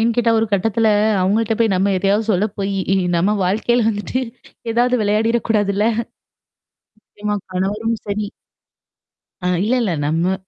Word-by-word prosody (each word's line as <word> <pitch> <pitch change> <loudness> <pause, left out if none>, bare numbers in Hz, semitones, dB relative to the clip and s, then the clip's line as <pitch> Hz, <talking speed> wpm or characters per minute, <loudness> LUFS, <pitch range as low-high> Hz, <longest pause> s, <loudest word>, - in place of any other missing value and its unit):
ஏன் 230 +1 +2
கேட்டா, 235 -1 +2
ஒரு 225 - +1
கட்டத்துல 220 +3 +2 0.3
அவங்கள்ட்ட 220 +4 +1
போய் 225 -3 +2
நம்ம 195 +2 +1
எதையாவது 200 +3 +1
சொல்ல 195 +3 +2
போய்யி 195 -1 -1 0.2
நம்ம 190 +5 +2
வாழ்க்கையில 225 +5 +1
வந்துட்டு 215 +4 -2 0.5
ஏதாவது 245 +2 +2
விளையாடிறக்கூடாதுல. 215 -1 +1 1.1
நிச்சயமா, 210 -1 -5 0.2
கணவரும் 210 +5 -1
சரி. 205 0 -2 1.1
அ, - - -6 0.2
இல்ல, 225 - +1
இல்ல. 205 -6 0
நம்ம 165 +5 +1
210 Hz, 125 wpm, -19 LUFS, 195-225 Hz, 1.1 s, ஏன்